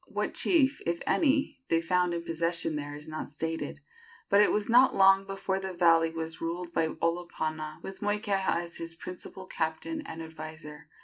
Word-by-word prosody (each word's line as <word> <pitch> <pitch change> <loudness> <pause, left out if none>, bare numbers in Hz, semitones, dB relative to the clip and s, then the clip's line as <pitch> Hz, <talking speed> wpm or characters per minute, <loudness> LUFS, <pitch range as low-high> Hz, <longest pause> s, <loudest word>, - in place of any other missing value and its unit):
What - - -2
chief, 290 -6 +3
if 170 0 0
any, 280 -3 +2
they 165 - +3
found 180 +1 +1
in 170 - -3
possession 165 -1 -1
there 145 0 -4
is 150 +1 -10
not 155 0 -5
stated; 160 +2 -4 0.5
but 200 +1 +6
it 210 - +5
was 210 -1 0
not 250 +3 +6
long 195 0 +6
before 195 0 -2
the 190 -1 -5
valley 165 -2 +4
was 165 0 -5
ruled 170 +1 -4
by 160 - +2
Olopana, 155 -2 -3
with 190 0 -8
Moikeha 205 -4 0
as 170 0 -9
his 165 0 -6
principal 185 +2 -8
captain 170 - -3
and 165 - -7
adviser. 155 -1 -9
170 Hz, 175 wpm, -29 LUFS, 160-195 Hz, 0.5 s, but